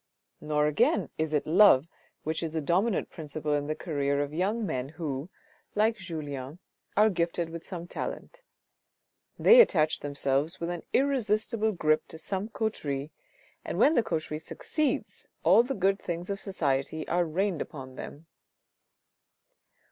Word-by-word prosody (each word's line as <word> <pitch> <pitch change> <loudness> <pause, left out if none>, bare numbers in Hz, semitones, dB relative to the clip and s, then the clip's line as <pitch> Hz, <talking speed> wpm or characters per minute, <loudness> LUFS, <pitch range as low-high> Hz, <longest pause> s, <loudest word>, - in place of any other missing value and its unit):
Nor 150 -1 +1
again 150 -1 +2
is 160 -1 0
it 150 -2 +1
love 165 -4 +6 0.4
which 160 +1 -2
is 160 -2 -3
the 160 - 0
dominant 185 +8 +1
principle 155 -2 -4
in 145 0 0
the 155 - -1
career 140 -4 -1
of 145 +1 -6
young 205 +7 0
men 130 -6 -3
who, 155 -1 -4 0.5
like 220 +2 +2
Julien, 150 -6 -6 0.4
are 215 +1 +6
gifted 170 -1 -1
with 165 0 -7
some 175 -3 -7
talent; - - -6 1.0
they 480 +2 +8
attach 155 - +3
themselves 140 +3 0
with 170 +1 -2
an 175 -2 -4
irresistible 220 -5 +1
grip 155 -3 +1
to - - -9
some 195 +5 -3
coterie, 150 -11 -3 0.5
and - - -4
when 305 - +5
the 240 - +4
coterie 155 -6 -3
succeeds 295 - -3 0.2
all - - +7
the 260 +3 -3
good 195 0 +2
things 175 +2 -4
of 200 - -3
society 155 -5 -1
are 175 +1 +2
rained 175 +1 -1
upon 130 -3 -7
them. 145 +4 -9
165 Hz, 150 wpm, -28 LUFS, 150-200 Hz, 1.0 s, they